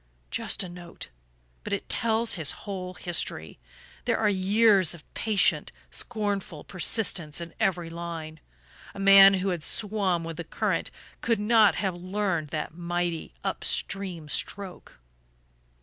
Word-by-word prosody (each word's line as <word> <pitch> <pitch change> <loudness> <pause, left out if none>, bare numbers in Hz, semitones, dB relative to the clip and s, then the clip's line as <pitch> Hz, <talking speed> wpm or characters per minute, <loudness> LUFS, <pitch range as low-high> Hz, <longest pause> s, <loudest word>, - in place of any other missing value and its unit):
Just - - 0
a - - -6
note! 175 -1 -10 0.5
But - - -4
it - - -3
tells 225 0 +2
his 160 -6 0 0.2
whole 185 -3 -5
history. 160 - -3 0.5
There - - +1
are 220 - +2
years 195 -1 +4
of 160 - -12
patient 215 -3 +2 0.2
scornful 205 -8 -3
persistence 180 -5 +1
in 170 -1 -8
every 175 -3 0
line. 165 -2 -6 0.6
A - - -8
man 195 0 +8
who 190 +1 -1
had 175 -3 -2
swum 195 -2 0
with 165 -1 -6
the 170 - -4
current - - -1 0.3
could 230 -3 +1
never 215 0 +4
have 190 -3 -1
learned 185 -3 -2
that 155 +1 -4
mighty 175 -1 -3
up - - -3
stream 185 -6 -2
stroke.... 190 - -5
185 Hz, 135 wpm, -27 LUFS, 170-200 Hz, 0.6 s, man